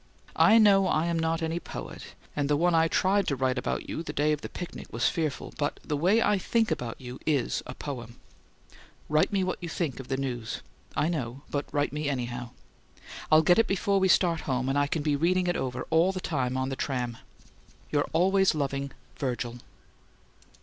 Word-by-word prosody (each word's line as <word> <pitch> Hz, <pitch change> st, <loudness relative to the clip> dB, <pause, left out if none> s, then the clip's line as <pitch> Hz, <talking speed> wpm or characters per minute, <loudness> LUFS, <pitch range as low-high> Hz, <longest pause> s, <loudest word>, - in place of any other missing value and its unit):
I 220 Hz, -, +7 dB
know 200 Hz, -3 st, +6 dB
I 155 Hz, -2 st, +2 dB
am 170 Hz, -1 st, 0 dB
not 165 Hz, 0 st, 0 dB
any 165 Hz, +1 st, -1 dB
poet -, -, -8 dB, 0.2 s
and 145 Hz, -1 st, 0 dB
the 145 Hz, -, +3 dB
one 175 Hz, +2 st, +3 dB
I 165 Hz, 0 st, +4 dB
tried 195 Hz, +3 st, +2 dB
to 140 Hz, -, +1 dB
write 130 Hz, 0 st, 0 dB
about -, -, -3 dB
you -, -, -3 dB
the 170 Hz, -, -5 dB
day 150 Hz, +1 st, +2 dB
of 150 Hz, -1 st, -1 dB
the -, -, -6 dB
picnic 175 Hz, -, -7 dB
was 115 Hz, +2 st, +1 dB
fearful 155 Hz, -4 st, -2 dB
but 145 Hz, -1 st, -1 dB
the 150 Hz, -, -1 dB
way 185 Hz, +10 st, +3 dB
I 205 Hz, -, +2 dB
THINK 225 Hz, +3 st, +1 dB
about 115 Hz, -2 st, -3 dB
you 125 Hz, 0 st, -8 dB
is 145 Hz, -6 st, +1 dB
a 130 Hz, -, -7 dB
poem. 120 Hz, -5 st, -7 dB, 0.9 s
Write 150 Hz, +1 st, +3 dB
me 195 Hz, -2 st, +1 dB
what 185 Hz, -, -2 dB
you 175 Hz, -, -4 dB
think 160 Hz, -6 st, -2 dB
of 130 Hz, -, -8 dB
the 135 Hz, -, -1 dB
news. 125 Hz, -4 st, -4 dB, 0.3 s
I 155 Hz, -, +2 dB
know 135 Hz, -5 st, -3 dB
but 145 Hz, 0 st, -3 dB
write 145 Hz, 0 st, 0 dB
me 150 Hz, -1 st, -1 dB
anyhow. 125 Hz, -2 st, -3 dB, 0.8 s
I'll 155 Hz, 0 st, +7 dB
get 175 Hz, +6 st, +5 dB
it 225 Hz, -, +4 dB
before 195 Hz, +1 st, +1 dB
we 190 Hz, -, +3 dB
start 175 Hz, -3 st, +3 dB
home 130 Hz, 0 st, 0 dB
and 135 Hz, -, 0 dB
I 145 Hz, 0 st, +2 dB
can 150 Hz, +1 st, -2 dB
be 150 Hz, -1 st, +2 dB
reading 180 Hz, +5 st, +2 dB
it 175 Hz, 0 st, +1 dB
over 130 Hz, -1 st, -3 dB
all 165 Hz, +4 st, +4 dB
the 190 Hz, -, -4 dB
time 130 Hz, -7 st, -1 dB
on 130 Hz, 0 st, -1 dB
the 135 Hz, -, -3 dB
tram. 125 Hz, -3 st, -2 dB, 0.7 s
Your 145 Hz, -1 st, +1 dB
always 190 Hz, +2 st, +3 dB
loving 140 Hz, -1 st, -2 dB, 0.2 s
VIRGIL. 120 Hz, -3 st, -3 dB
150 Hz, 205 wpm, -28 LUFS, 130-175 Hz, 0.9 s, I